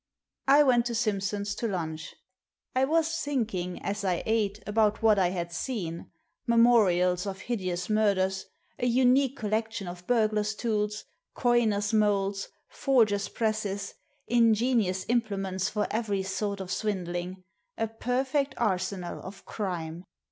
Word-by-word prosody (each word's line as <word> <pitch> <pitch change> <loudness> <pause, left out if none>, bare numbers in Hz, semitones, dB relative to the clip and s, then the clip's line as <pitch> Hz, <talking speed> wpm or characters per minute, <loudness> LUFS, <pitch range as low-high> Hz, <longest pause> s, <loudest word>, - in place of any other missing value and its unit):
I 285 +2 +7
went 245 -3 +3
to 235 - -3
Simpson's 205 -2 -1
to 230 +3 -2
lunch. 160 -5 -4 0.6
I 260 +1 +4
was 325 +2 +1
thinking, 215 -11 -2
as 205 +1 -3
I 185 -3 0
ate, 215 -2 0
about 215 +1 +1
what 215 -2 +5
I 185 - +4
had 175 -1 -3
seen, 175 -5 -4 0.4
memorials 205 -6 +4
of 195 -1 -5
hideous 185 -6 -3
murders, 195 -3 +1 0.3
a 245 - +1
unique 260 +2 +3
col 210 -3 -4
lection 220 -2 -1
of 175 0 -8
burglars' 215 -2 +1
tools, 210 -2 -1 0.3
coiners' 225 -4 +2
moulds, 200 -2 +1 0.2
forgers' 215 -7 +2
presses, 210 -3 -2 0.3
ingenious 230 -4 +2
implements 195 -5 0
for 210 -1 -1
every 210 -4 -1
sort 200 +1 -2
of 185 -1 -6
swindling 185 -2 -3 0.2
— - - -47
a 225 - +1
perfect 260 +5 -1
arsenal 185 -4 -2
of 195 +1 -10
crime! 175 -5 -4
210 Hz, 135 wpm, -28 LUFS, 190-230 Hz, 0.6 s, I